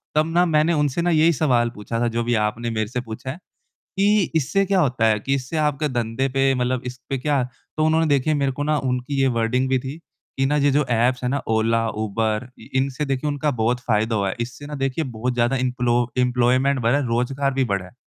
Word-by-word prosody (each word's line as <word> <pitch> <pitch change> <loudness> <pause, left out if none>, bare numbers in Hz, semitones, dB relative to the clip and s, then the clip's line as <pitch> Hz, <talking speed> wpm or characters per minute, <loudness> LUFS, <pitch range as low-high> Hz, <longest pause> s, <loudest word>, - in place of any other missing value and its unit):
तब 155 0 +4
ना 175 +1 +4
मैंने 160 0 +2
उनसे 150 0 0
ना 175 - +1
यही 165 0 +4
सवाल 125 -5 +2
पूछा 110 +3 -4
था 120 - +1
जो 120 - +1
भी 120 - 0
आपने 115 +3 -3
मेरे 110 -2 -1
से 125 +2 -3
पूछा 115 +2 -7
है 150 - -8 0.6
कि 205 -1 +3
इससे 160 +6 +2
क्या 195 0 +2
होता 130 -8 +1
है? 110 -1 +2
कि 135 +6 -1
इससे 135 +4 -4
आपके 150 -1 +1
धंधे 120 +2 -1
पे 135 +1 +2
मतलब 125 0 0
इस 125 0 -6
पे 135 - -1
क्या 140 0 +1 0.3
तो 155 - +2
उन्होंने 160 +1 +3
देखिए 145 +1 +2
मेरे 140 -2 +1
को 145 +3 -4
ना 150 +1 +1
उनकी 130 +1 -1
ये 135 - +4
वर्डिंग 125 +3 +1
भी 130 -1 +2
थी। 135 +5 -7 0.4
कि 135 - +2
ना 145 +2 +1
ये 145 0 +3
जो 145 +1 +2
ऐप्स 125 +2 +1
है 125 - 0
ना 140 +1 -1
ओला, 115 +1 +2
यूबर 110 +2 -2 0.3
इनसे 135 +2 0
देखिए 135 +1 -2
उनका 150 +1 0
बहुत 120 +3 +1
फ़ायदा 110 -1 0
हुआ 100 -2 0
है। - - -4
इससे 125 +5 -6
ना 150 - -6
देखिए 135 +3 -1
बहुत 125 0 -3
ज़्यादा 120 +2 +1
इन्पलो 125 -1 0 0.2
इंप्लॉयमेंट 125 +2 +2
बढ़ा 120 +4 +3
है, 145 - 0
रोज़गार 135 +4 0
भी 135 0 +1
बढ़ा 100 -6 -1
है। 90 - -14
130 Hz, 235 wpm, -22 LUFS, 120-145 Hz, 0.6 s, तब